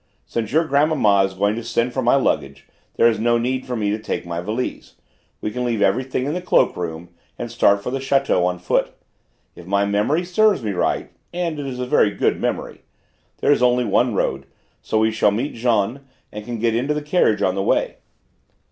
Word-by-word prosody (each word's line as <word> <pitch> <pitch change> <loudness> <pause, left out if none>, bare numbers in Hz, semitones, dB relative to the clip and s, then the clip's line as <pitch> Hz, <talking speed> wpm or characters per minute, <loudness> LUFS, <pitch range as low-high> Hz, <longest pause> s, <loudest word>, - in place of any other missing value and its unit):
Since 115 -2 -3
your 160 +4 +3
grandmamma 140 -10 +3
is 95 0 -6
going 100 +2 +1
to 115 - -5
send 115 +1 -1
for 130 - -1
my 120 +2 +3
luggage 70 - -1 0.3
there 115 - +5
is 110 -2 +1
no 120 +1 +2
need 130 +2 -2
for 125 - -3
me 105 -3 -1
to 105 - -2
take 110 - -4
my 85 0 -4
valise; 110 +7 -4 0.5
we 105 - -3
can 125 +3 -3
leave 120 -3 -1
everything 130 +5 0
in 145 - -2
the 180 - -3
cloak 180 - +2
room 85 -1 -5 0.3
and 120 -1 -5
start 100 -3 +3
for 125 - -3
the 135 - -2
château 135 -8 +1
on 90 0 -1
foot; 90 - -1 0.6
if 85 - -13
my 100 +1 +1
memory 105 - 0
serves 195 - +2
me 105 - -1
right 90 - -1 0.2
and 170 -3 -3
it 140 - -4
is 130 -2 -5
a 125 - -3
very 115 -4 +3
good - - -1
memory - - -3 0.6
there - - +3
is 145 - +3
only 125 0 +3
one 120 -1 +1
road, 70 -6 -1 0.3
so 110 - -2
we 110 0 +3
shall 110 -1 +3
meet 115 +8 -2
Jean 115 +1 0 0.3
and 105 0 -8
can 120 0 -4
get 115 +1 +1
into 135 +6 0
the 150 - -3
carriage 130 - +2
on 95 - +2
the 95 - -2
way." - - 0
115 Hz, 215 wpm, -21 LUFS, 100-130 Hz, 0.6 s, there